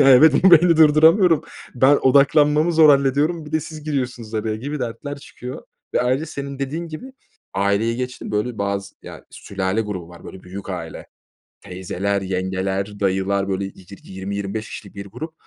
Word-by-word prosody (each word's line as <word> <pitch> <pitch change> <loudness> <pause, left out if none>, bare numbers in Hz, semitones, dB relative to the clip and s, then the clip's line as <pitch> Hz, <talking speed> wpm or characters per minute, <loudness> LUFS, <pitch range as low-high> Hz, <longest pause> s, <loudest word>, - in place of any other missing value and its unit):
Ya, 140 - +6
evet, 140 +3 +7
bu 190 - +8
beyni 170 0 +6
durduramıyorum. 160 +3 +5 0.3
"Ben 130 +3 +5
odaklanmamı 150 +4 +4
zor 160 -1 +6
hallediyorum, 145 +4 +2
bir 150 - -11
de 155 - +1
siz 155 0 -9
giriyorsunuz 125 -6 -4
araya." 110 0 -2
gibi 145 +6 -5
dertler 125 +4 -5
çıkıyor. 125 -2 -9 0.3
Ve - - +2
ayrıca, 130 +5 0
senin 140 -2 -7
dediğin 155 +5 -4
gibi, 205 +12 -9 0.4
aileyi 100 +4 +1
geçtim, 125 0 -5
böyle, 105 +3 -2
bazı, 100 0 -3
ya, - - -11
sülale 95 +2 -3
grubu 100 -6 -5
var 85 -1 -14
böyle 95 - -11
büyük 95 +2 -8
aile; 85 -3 -7 0.5
teyzeler, 95 +1 -3
yengeler, 95 +2 -3
dayılar, 95 0 0
böyle, 95 0 -2
yi 95 -1 -10 0.2
yirmi 95 +1 -6
25 100 +2 -4
kişilik 100 - -10
bir 100 0 -8
grup. 150 +11 -8
120 Hz, 165 wpm, -21 LUFS, 100-150 Hz, 0.5 s, bu